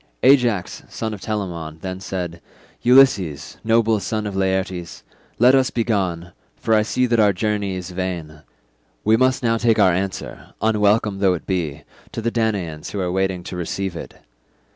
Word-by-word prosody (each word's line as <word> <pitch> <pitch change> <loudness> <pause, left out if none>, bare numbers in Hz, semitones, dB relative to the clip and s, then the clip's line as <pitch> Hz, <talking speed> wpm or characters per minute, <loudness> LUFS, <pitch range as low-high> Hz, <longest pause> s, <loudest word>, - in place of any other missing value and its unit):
Ajax 120 -8 +3
son 110 -1 -4
of 100 - -8
Telamon 85 -7 -4
then 95 -1 -5
said, 90 -3 -5 0.4
"Ulysses, 105 - +3
noble 115 -1 +3
son 110 +1 -3
of 100 -2 -4
Laertes, 95 -2 -2 0.3
let 125 +3 +6
us 130 -1 +4
be 115 - -1
gone, 90 -6 -1 0.2
for 110 - -1
I 110 - +5
see 125 +4 0
that 120 -2 +1
our 105 -1 +5
journey 100 0 -1
is 90 0 -6
vain. 85 -4 -5 0.6
We 110 +1 +4
must 130 +2 +2
now 115 -1 +2
take 115 -1 +2
our 90 - +5
answer, 95 +2 -5
unwelcome 105 -1 +2
though 95 -2 +3
it 85 - -8
be, 80 -6 -2 0.3
to - - -4
the 115 - 0
Danaans 100 -10 -2
who 100 - -4
are 90 -2 -1
waiting 95 -1 -1
to 90 - -7
receive 90 +1 -3
it. - - -8
100 Hz, 170 wpm, -21 LUFS, 90-110 Hz, 0.6 s, let